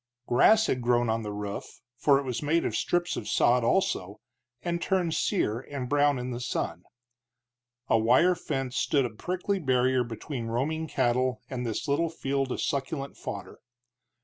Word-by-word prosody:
Grass 215 - +5
had 125 - 0
grown 120 -1 +2
on 115 +1 0
the 105 -1 -5
roof, 105 -1 -6 0.2
for 135 +4 +4
it 140 - -1
was 125 -3 -3
made 155 +3 +1
of - - -1
strips 175 0 0
of 105 - -5
sod, 125 0 +3
also, 105 - 0 0.4
and 170 0 -2
turned 180 -4 +1
sere 120 - 0
and 135 -1 -6
brown 145 0 +3
in 125 0 -4
the 120 - -4
sun. 125 - -3 1.0
A 115 - +4
wire 125 +11 +5
fence 135 -6 -3
stood 140 -3 +2
a 120 - -3
prickly 185 - -2
barrier 130 -3 +2
between 120 +1 -5
roaming 150 +8 -1
cattle 125 -1 +1
and 125 -2 -3
this 115 +6 -3
little 155 +4 +1
field 135 -4 -2
of - - -2
succulent 140 0 -2
fodder. - - -7
130 Hz, 170 wpm, -28 LUFS, 120-155 Hz, 1.0 s, Grass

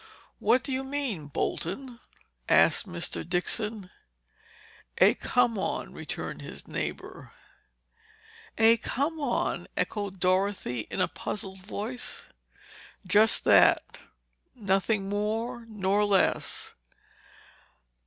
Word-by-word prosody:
"What 255 +2 +3
do 275 - -5
you 260 0 -1
mean, 265 - -3
Bolton?" 235 - -3 0.5
asked - - +4
Mr. 175 -2 -3
Dixon. 190 +3 -2 1.1
"A - - +6
come 235 -3 +1
on," - - -3
returned - - -6
his - - -9
neighbor. - - -5 1.2
"A 225 +1 +6
come 285 +7 -2
on?" 280 -5 -1
echoed 200 -3 -2
Dorothy 185 - 0
in - - -2
a 185 - +3
puzzled 190 -2 -5
voice. 215 +6 -5 0.8
"Just 210 +4 +4
that—nothing 200 - +1
more 225 +4 -2
nor 205 -1 +1
less." 200 -2 +1
210 Hz, 95 wpm, -28 LUFS, 190-240 Hz, 1.2 s, A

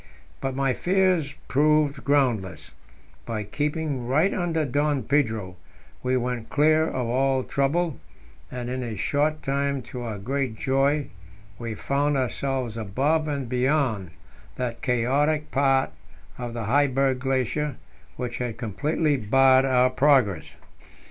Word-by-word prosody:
But 135 -1 -2
my 135 -1 +1
fears 180 -4 +1
proved 150 0 +2
groundless; 110 - 0 0.5
by 110 -2 -3
keeping 145 +3 -2
right 155 +9 +2
under 165 -4 0
Don 145 0 0
Pedro 110 -8 0 0.4
we 130 0 +1
went 125 -2 -3
clear 155 +2 +3
of 130 -5 -2
all 130 +2 +1
trouble, 150 +4 0 0.5
and 125 -1 -5
in 130 +1 -3
a 115 -4 -4
short 150 +7 0
time, 140 -1 -1
to 120 +2 -7
our 115 -3 -4
great 130 +3 -2
joy, 135 +4 +1 0.5
we 115 -2 -4
found 140 +4 0
ourselves 130 -2 -2
above 140 +10 0
and 140 -4 -3
beyond 125 - 0 0.5
that 120 -2 -4
chaotic 140 +5 +1
part 135 -1 +2 0.4
of 120 -1 -6
the 115 - -3
Heiberg 135 +2 +2
Glacier 135 +2 -1 0.4
which 125 -2 -4
had 120 -3 -3
completely 145 - 0
barred 130 +3 +4
our 130 -1 +3
progress. 130 -7 +2
135 Hz, 130 wpm, -25 LUFS, 120-145 Hz, 0.5 s, barred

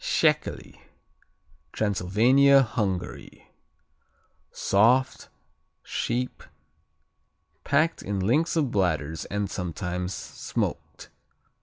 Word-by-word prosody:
Szekely - - 0 0.9
Transylvania, 115 +8 +4
Hungary 100 -7 -4 1.0
Soft; 120 +6 +2 0.5
sheep; 125 +2 -3 1.2
packed 155 +4 +1
in 100 0 -3
links 145 - +1
of 145 -6 +1
bladders 80 -6 -1
and 105 0 -2
sometimes 90 0 -4
smoked. - - -5
105 Hz, 65 wpm, -26 LUFS, 90-130 Hz, 1.2 s, Transylvania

